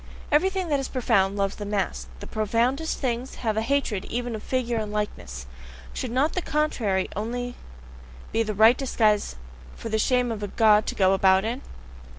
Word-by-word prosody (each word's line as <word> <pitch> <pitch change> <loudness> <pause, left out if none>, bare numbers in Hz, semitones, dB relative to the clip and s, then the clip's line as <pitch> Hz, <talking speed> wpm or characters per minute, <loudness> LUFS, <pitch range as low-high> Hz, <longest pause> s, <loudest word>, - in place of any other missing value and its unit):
Everything 375 +4 +2
that 285 -2 +2
is 270 - -3
profound 200 -6 +1
loves 195 -1 -1
the 210 - -5
mask: 205 -2 -2
the - - -6
profoundest 235 +8 0
things 250 -1 -2
have 220 -3 -1
a 220 - +1
hatred 235 -5 0
even 240 0 -3
of 215 - -5
figure 245 -2 -1
and 215 -1 -3
likeness. 65 - -4 0.5
Should 255 - -3
not 265 +6 +1
the 365 - -1
CONTRARY 235 - 0
only 245 +4 -3 0.8
be 225 - +1
the 215 -2 -2
right 220 +4 +7
disguise 215 - +1 0.4
for 230 - -6
the 220 0 0
shame 250 +1 +2
of 220 -2 -4
a 205 - -2
God 215 0 +4
to - - -2
go 190 -1 +4
about 190 +1 +4
in? 240 +4 -3
225 Hz, 180 wpm, -25 LUFS, 210-255 Hz, 0.8 s, right